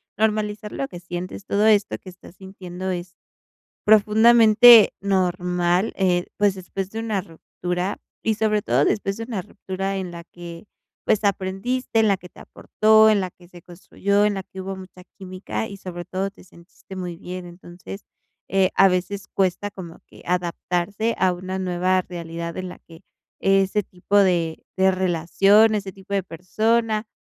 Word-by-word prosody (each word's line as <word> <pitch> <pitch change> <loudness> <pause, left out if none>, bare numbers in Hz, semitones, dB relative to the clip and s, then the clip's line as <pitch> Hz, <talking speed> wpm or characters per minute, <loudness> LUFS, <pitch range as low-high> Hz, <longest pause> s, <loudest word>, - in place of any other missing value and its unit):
normalizar 210 -1 -1
lo 275 - -3
que 175 - -10
sientes. 175 +3 -7
Todo 205 0 +1
esto 210 -2 +3
que 190 - -12
estás 180 0 -15
sintiendo 190 -1 -7
es 175 0 -6 0.7
profundamente 220 +2 +7
normal, 180 -1 0
eh, 180 -2 +1
pues, 205 -1 +2
después 190 +1 -6
de 220 - -6
una 220 -3 -1
ruptura 180 +1 -5 0.3
y 220 - +2
sobre 215 0 +1
todo 135 -6 +1
después 195 -2 -1
de - - -5
una 225 -5 -4
ruptura 195 0 -5
en 185 -2 -5
la 170 0 -9
que, 170 +1 -11 0.4
pues, 215 -1 +2
aprendiste, 200 +5 -1
en 220 - +3
la 200 - +3
que 180 -1 -14
te - - -17
aportó, 220 0 +3
en 210 -2 +3
la 185 -1 -3
que 175 0 -20
se 175 -1 -15
construyó, 200 +4 -1
en 210 -1 +1
la 195 - -4
que 190 0 -11
hubo 195 +1 -5
mucha 185 -1 -12
química 185 +3 -5
y 200 - -8
sobre 175 -2 -7
todo 190 +2 -3
te - - -18
sentiste 180 +2 -15
muy 180 -2 -5
bien. 180 +1 -8
Entonces, 175 +3 -11 0.4
eh, 190 -1 +2
a 195 - +6
veces 185 +2 -2
cuesta 195 +1 0
como 175 -4 -10
que - - -16
adaptarse 180 +4 -1
a 185 -1 +2
una 185 +1 -5
nueva 185 0 +1
realidad 170 -1 -7
en 185 0 -4
la - - -11
que 165 -1 -17 0.4
ese 195 +1 +2
tipo 185 +2 -3
de 175 -5 +1
de 190 0 +4
relación, 190 +4 +3
ese 200 -2 -5
tipo 195 +1 -13
de 195 - +1
persona, 215 +6 0
190 Hz, 170 wpm, -22 LUFS, 180-205 Hz, 0.7 s, profundamente